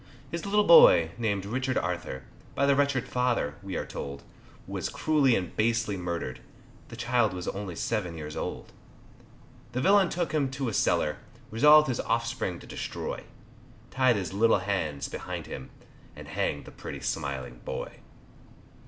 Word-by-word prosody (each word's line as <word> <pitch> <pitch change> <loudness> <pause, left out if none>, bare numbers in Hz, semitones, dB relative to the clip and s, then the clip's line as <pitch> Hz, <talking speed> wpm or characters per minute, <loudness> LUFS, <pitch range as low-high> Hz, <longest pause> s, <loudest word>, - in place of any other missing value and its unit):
His 170 +3 -4
little 210 +1 +3
boy 85 - +8
named 100 -4 -1
Richard 130 +4 -1
Arthur, 85 -7 -3 0.3
By 140 - +2
the 140 0 +4
wretched 140 -3 +1
father, 125 -12 0
we 100 -2 -6
are - - -3
told, 70 0 -7 0.4
Was - - -4
cruelly 145 -6 +3
and 90 -3 -3
basely 115 -2 +1
murdered, 85 -8 -4 0.5
The - - -10
child 120 -3 +1
was 90 -1 -5
only 95 -3 -5
seven 90 -7 -2
years 75 -1 -6
old; - - -5 1.0
The 125 - -1
villain 195 +2 +5
took 175 -2 -2
him 145 -4 +1
to 135 -2 -3
a - - -5
cellar, 75 -6 +1 0.3
Resolved 150 +7 +7
his 125 -3 -1
offspring 115 -6 -1
to - - -12
destroy, - - -5 0.7
Tied 130 -2 +3
his 95 -4 -3
little 115 +3 +4
hands 80 -8 -2
behind - - -6
him, 65 - -8 0.5
And - - -10
hanged 70 - -2
the - - -11
pretty - - -8
smiling 65 -3 -3
boy. - - -5
115 Hz, 155 wpm, -28 LUFS, 85-130 Hz, 1.0 s, boy